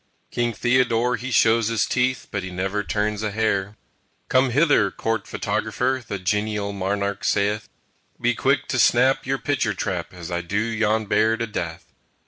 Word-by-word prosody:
King 120 0 0
Theodore 120 +1 +2
he 125 +3 -6
shows 115 -2 +4
his 115 -1 +1
teeth, 125 0 0
But 100 - -2
he 95 - -6
never 95 +3 -2
turns 105 0 -1
a 110 - -1
hair. 105 -1 -1 0.5
"Come 130 +1 +3
hither, 145 -6 +3
Court 115 +2 -2
Photographer," 130 0 -1
The 100 - -3
genial 105 +2 -1
monarch 100 +1 -2
saith, 105 +1 0 0.5
"Be - - +2
quick - - +1
to - - 0
snap 130 +2 +4
your 135 +1 +1
picture 130 -7 -1
trap 90 -3 -3
As 90 -2 -9
I 85 0 -1
do 90 +4 -3
yon 110 0 +1
Bear 110 +2 +2
to 115 - -1
death." 85 -7 -5
110 Hz, 165 wpm, -23 LUFS, 100-120 Hz, 0.5 s, shows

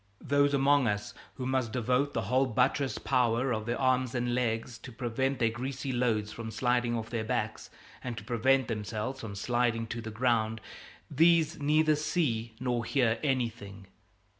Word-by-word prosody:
Those 145 +1 +2
among 140 -1 +4
us 105 -1 -2 0.2
who 130 - -5
must 130 -3 -1
devote 125 +3 0
the 115 - 0
whole 130 +6 +2
buttressed 130 +3 0
power 125 0 +2
of 110 0 -3
their 120 - -1
arms 130 -1 +1
and 120 0 0
legs 115 -1 -1
to 125 - -10
prevent 130 +3 -1
their 115 -2 +2
greasy 130 +3 -4
loads 115 -4 0
from 115 0 -6
sliding 120 +1 0
off 110 0 -6
their 115 -2 -1
backs 110 - -3 0.3
and 120 -3 -4
to 110 - -6
prevent 125 +3 +2
themselves 110 +4 -4
from 105 -5 -7
sliding 120 +2 0
to 115 +1 -5
the 110 - -6
ground, 110 -1 0 0.5
these 165 +2 +3
neither 155 +1 +3
see 130 -8 -1
nor 125 -2 -1
hear 115 -2 +1
anything. 115 -8 -2
120 Hz, 165 wpm, -30 LUFS, 115-130 Hz, 0.5 s, among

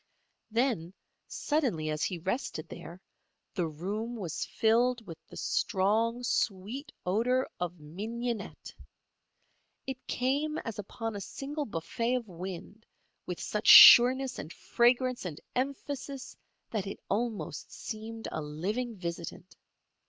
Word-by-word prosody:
Then, 225 -7 0 0.3
suddenly, 235 - 0
as 155 0 -2
he 185 - -1
rested 170 - -3
there, 170 +3 -9 0.5
the 175 -4 0
room 205 +10 -4
was 175 -7 -4
filled 235 +1 +2
with 165 -4 -9
the - - -11
strong, 225 +4 +1
sweet 240 +6 -1
odour 240 +8 +2
of 175 -1 -3
mignonette. 220 +8 -5 1.1
It 265 -1 -6
came 285 +5 0
as 225 -2 -5
upon 225 +2 -5
a 200 - -4
single 290 +8 -4
buffet 230 +7 -1
of 240 -3 -3
wind 185 +4 -8 0.4
with - - -4
such - - -3
sureness 255 +2 +10
and 155 - -7
fragrance 245 +5 +2
and 165 -5 -5 0.2
emphasis 275 0 -4 0.4
that 210 -4 -2
it 195 - -6
almost 225 +1 -2
seemed 225 0 -6
a 155 - -3
living 200 +11 -3
visitant. 170 0 -6
225 Hz, 120 wpm, -30 LUFS, 180-250 Hz, 1.1 s, sureness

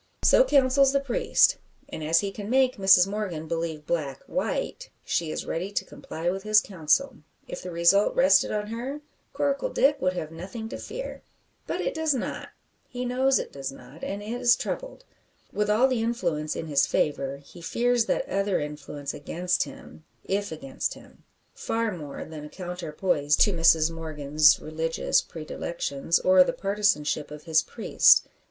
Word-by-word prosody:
So - - +6
counsels 275 - +4
the 275 - +3
priest; 275 -4 +2 0.3
and 155 - -7
as 160 +2 +3
he 200 -1 -3
can 205 +1 -7
make 260 0 +3
Mrs 190 -2 +6
Morgan 195 -6 -4
believe 165 -2 -3
black 145 -6 -3
white, - - -3 0.2
she 165 -2 -1
is - - -4
ready 180 +5 -3
to - - -1
comply 165 +2 -7
with 195 +1 -4
his 215 +1 +5
counsel. 185 - 0 0.3
If - - -7
the 180 - -7
result 170 +4 +3
rested - - +4
on 210 -1 -2
her, 255 +6 -5 0.3
Coracle 285 - 0
Dick 285 - +2
would 185 0 +1
have 160 -3 -5
nothing 195 +7 -7
to - - -7
fear. - - -7 0.5
But - - -2
it - - -2
does 320 -3 0
not 250 - -4 0.4
he 250 0 -4
knows 260 +2 +2
it - - -4
does 135 -1 -5
not 140 +3 -14
and 200 +1 -4
is 240 +2 +2
troubled. - - -6 0.5
With 210 0 0
all 225 +5 +4
the 255 -3 -1
influence 175 -10 -1
in - - -4
his 145 -3 +2
favour, 140 -2 -1
he 145 +5 -15
fears 240 +6 +1
that - - 0
other 195 0 0
influence 150 -1 -6
against 175 +5 -1
him 155 - -13 0.2
if 200 0 -2
against 135 -4 -4
him, - - -18 0.3
far 225 -3 -2
more 150 -4 -7
than 155 -2 -9
a 150 - -9
counterpoise 175 -4 -1
to 205 - +4
Mrs 165 -1 +4
Morgan's 155 -2 +2
religious 160 +1 0
predilections, 160 -1 -3
or 185 0 +6
the - - -2
partisanship 195 -7 0
of 150 0 -10
his 160 -2 +3
priest. - - +4
180 Hz, 170 wpm, -26 LUFS, 155-230 Hz, 0.5 s, So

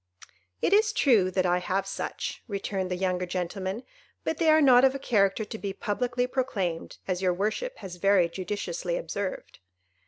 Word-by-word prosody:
"It - - +3
is 430 +1 +4
true 230 - +4
that 185 0 0
I 180 0 +2
have 190 +2 -1
such," - - -4
returned 195 -3 -3
the 180 - -1
younger 180 -1 -1
gentleman, 190 +5 -3 0.4
"but - - -1
they 330 -2 +3
are 310 0 +6
not 255 -4 +6
of 265 0 +4
a - - 0
character 210 -5 +1
to 220 - -7
be 200 -1 -4
publicly 240 +4 -1
proclaimed, 205 -10 -2
as 185 -1 -1
your 180 -2 +2
worship 220 - -2
has 180 -2 -8
very 195 -1 +4
judiciously 175 -1 -3
observed." 190 +3 -5
195 Hz, 175 wpm, -27 LUFS, 180-245 Hz, 0.4 s, are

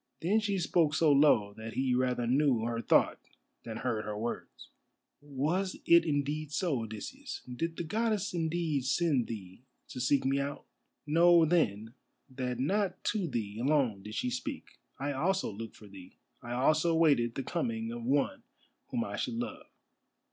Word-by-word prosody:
Then 200 +7 +3
she 205 -3 -1
spoke 165 -3 +2
so 155 -1 +4
low 140 -8 +4
that 110 +1 -7
he 130 -1 +1
rather 125 -1 +1
knew 130 -1 +3
her 115 0 -2
thought - - +3 0.4
than 110 -1 -6
heard 115 -3 -2
her 105 -1 -4
words: 115 +3 -6 0.5
"Was 150 +7 -1
it 170 0 +6
indeed 150 0 -1
so, 150 -4 0
Odysseus? 255 - -7
Did 165 +5 -3
the - - -2
Goddess 215 +3 -1
indeed 160 -4 -1
send 140 -3 +1
thee 95 -2 -8 0.3
to 125 - -6
seek 135 +3 +2
me 135 +1 +2
out? 140 +1 -4 0.4
Know, 170 +2 +5
then, 115 - +1 0.4
that 125 -2 -3
not 190 +7 0
to 200 -5 -1
thee 110 -6 -4
alone 130 -6 +1
did 105 +2 -8
she 250 - -1
speak. 255 +3 -6 0.2
I 140 +1 -2
also 180 - 0
looked 115 +2 -8
for 105 - -14
thee. 95 -2 -13 0.2
I 120 - -6
also 155 +6 +3
waited 140 -8 +3
the 135 - -3
coming 115 -8 -2
of 120 0 -6
one 145 - +1 0.5
whom 240 -2 -1
I - - -5
should - - -2
love. 240 +1 -5
140 Hz, 165 wpm, -31 LUFS, 120-170 Hz, 0.5 s, it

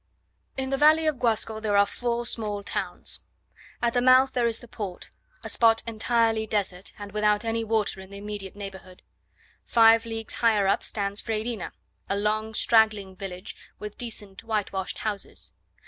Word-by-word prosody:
In 265 0 -2
the 270 - 0
valley 310 +2 +6
of 305 -5 0
Guasco 220 -2 +1
there 210 -2 +1
are 200 - +6
four 240 +2 -2
small 210 -3 -2
towns. - - -2 0.6
At 235 -1 +2
the 245 - +2
mouth 255 +1 +6
there 240 -2 +2
is 230 -1 +1
the 240 - -11
port, 200 -5 -6 0.3
a - - -5
spot 225 -1 +3
entirely 225 -1 +1
desert, 195 -3 -2
and 205 -1 -8
without 210 +1 +2
any 225 0 0
water 215 -3 0
in 190 - -12
the 200 - -9
immediate 205 -2 -6
neighbourhood. 190 -2 -9 0.6
Five 225 0 +5
leagues 225 -1 -5
higher 220 -4 +3
up 195 - +2
stands 200 -1 -2
Freyrina, 220 -1 -3 0.4
a 200 - +1
long 215 +1 -1
straggling 215 -5 +3
village, 185 0 -7 0.2
with 210 0 -7
decent 210 -5 -6
whitewashed 205 -4 -2
houses. 210 -2 -4
220 Hz, 165 wpm, -26 LUFS, 200-230 Hz, 0.6 s, valley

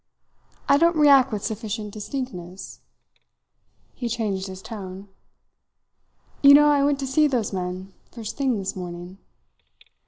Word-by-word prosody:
I 280 - +5
don't 335 +1 +3
react 275 -4 +6
with 210 -2 -4
sufficient 215 -1 -4
distinctness." 200 -6 -7 1.1
He 240 - -4
changed 205 -4 -2
his 190 0 -9
tone. 195 -3 -8 1.3
"You 280 0 +9
know 295 +1 +6
I 285 -1 +3
went 285 0 +2
to - - -2
see 300 +3 +3
those 240 -7 -1
men 185 +1 -5 0.2
first 225 -1 -7
thing 265 -5 0
this 195 -1 -4
morning." 180 +1 -8
220 Hz, 130 wpm, -24 LUFS, 190-275 Hz, 1.3 s, You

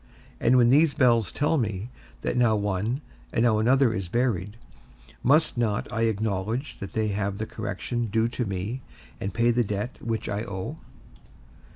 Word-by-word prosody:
And 125 +2 +4
when 120 -1 +5
these 150 +2 +5
bells 120 - +3
tell 150 +1 +1
me, 105 0 -3 0.3
that - - -1
now 120 -3 +4
one, 105 +6 -1 0.3
and 115 - +1
now 110 -3 +4
another 125 +1 +4
is 95 -4 -3
buried, 110 -3 0 0.6
must 145 -1 +3
not 110 -3 0
I 115 +1 +1
acknowledge 110 +4 -2
that 100 - -7
they 110 -1 0
have 100 -1 -2
the 110 - -2
correction 120 +1 -3
due 110 +2 +1
to 120 0 -2
me, 100 +7 -3 0.4
and 100 - -3
paid 115 +4 +3
the 120 +1 +3
debt 105 +3 -4
that 115 -2 -2
I 105 +1 -2
owe? 95 -4 -5
110 Hz, 170 wpm, -26 LUFS, 100-120 Hz, 0.6 s, when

